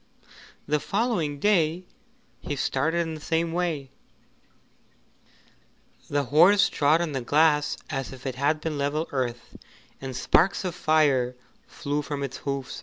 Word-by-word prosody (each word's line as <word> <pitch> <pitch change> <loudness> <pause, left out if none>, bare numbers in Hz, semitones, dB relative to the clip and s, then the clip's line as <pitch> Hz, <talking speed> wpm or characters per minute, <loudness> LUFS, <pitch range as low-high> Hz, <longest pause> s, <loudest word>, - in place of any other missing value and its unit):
The 150 +1 +1
following 195 - -1
day 175 -1 +1 0.5
he 145 - -4
started 155 +5 0
in 165 -1 -3
the 155 - -8
same 165 +1 -1
way; 165 -7 -2 2.2
the 145 0 +1
horse 175 - +5
trod 150 +3 +2
on 170 -3 -2
the 135 -2 -3
glass 150 +3 +2
as 135 -1 -4
if 130 0 -12
it 130 - -2
had 145 +4 0
been 150 -2 -3
level 150 +3 -1
earth, 125 -3 -4 0.5
and 135 -1 -6
sparks 190 +9 +2
of 180 - -2
fire 145 -7 +2 0.3
flew 145 +1 -3
from 145 -1 -4
its 135 -1 -5
hoofs. 140 -2 -4
150 Hz, 140 wpm, -26 LUFS, 140-165 Hz, 2.2 s, horse